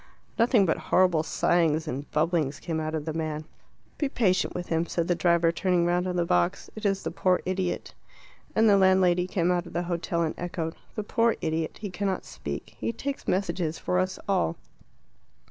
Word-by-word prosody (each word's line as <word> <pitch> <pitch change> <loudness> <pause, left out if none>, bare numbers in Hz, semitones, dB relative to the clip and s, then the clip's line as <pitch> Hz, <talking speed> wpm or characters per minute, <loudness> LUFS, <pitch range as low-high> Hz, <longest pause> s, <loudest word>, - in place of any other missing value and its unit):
Nothing 230 -3 +5
but 160 - +1
horrible 180 -4 +4
sighings 160 -1 +1
and 140 +3 -4
bubblings 155 -2 0
came 165 -2 -3
out 155 0 -2
of 150 -2 -3
the 160 - -3
man. 155 -1 -3 0.5
"Be 290 - +1
patient 190 -8 +1
with 175 0 -5
him," 165 +1 +1
said 170 0 -1
the 175 - +3
driver, 170 0 +3
turning 180 0 +1
round 175 +1 +1
on 180 - -2
the 175 -1 +1
box. 90 - 0
"It 215 -1 -1
is 195 -1 0
the - - -3
poor 185 -1 +2
idiot." 185 -1 -2 0.6
And 220 0 +5
the 200 -2 +6
landlady 185 -2 +4
came 180 -1 +1
out 175 -1 0
of - - -11
the 175 - -1
hotel 170 -1 -1
and 160 - -1
echoed 165 -2 -3 0.2
"The 215 - -2
poor 230 +2 +2
idiot. 160 0 -2
He 205 -3 -4
cannot 195 0 -2
speak. - - -7
He - - -1
takes 275 +4 -5
messages 170 -4 0
for 180 - 0
us 185 0 -1
all." 185 - +1
175 Hz, 195 wpm, -27 LUFS, 165-190 Hz, 0.6 s, the